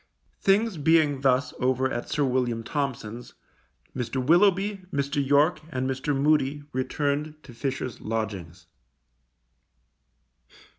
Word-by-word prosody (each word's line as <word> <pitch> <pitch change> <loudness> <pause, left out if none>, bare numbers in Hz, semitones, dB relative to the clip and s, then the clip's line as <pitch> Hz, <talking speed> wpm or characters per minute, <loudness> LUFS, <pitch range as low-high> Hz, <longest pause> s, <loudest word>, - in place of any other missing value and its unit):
Things 200 0 +2
being 150 -2 +3
thus 130 -1 +2
over 130 +1 +1
at 120 - -4
Sir 150 - 0
William 125 -3 0
Thompson's, 125 -5 -4 0.6
Mr. 125 -1 -4
Willoughby, 190 +8 +3
Mr. 140 +1 0
York, 145 +4 +3
and 130 -4 -2
Mr. 135 +1 -1
Moody, 145 -1 +2
returned 145 +3 -1
to 125 - -13
Fisher's 130 -1 -4
lodgings. 95 -6 -4
135 Hz, 105 wpm, -26 LUFS, 125-150 Hz, 0.6 s, being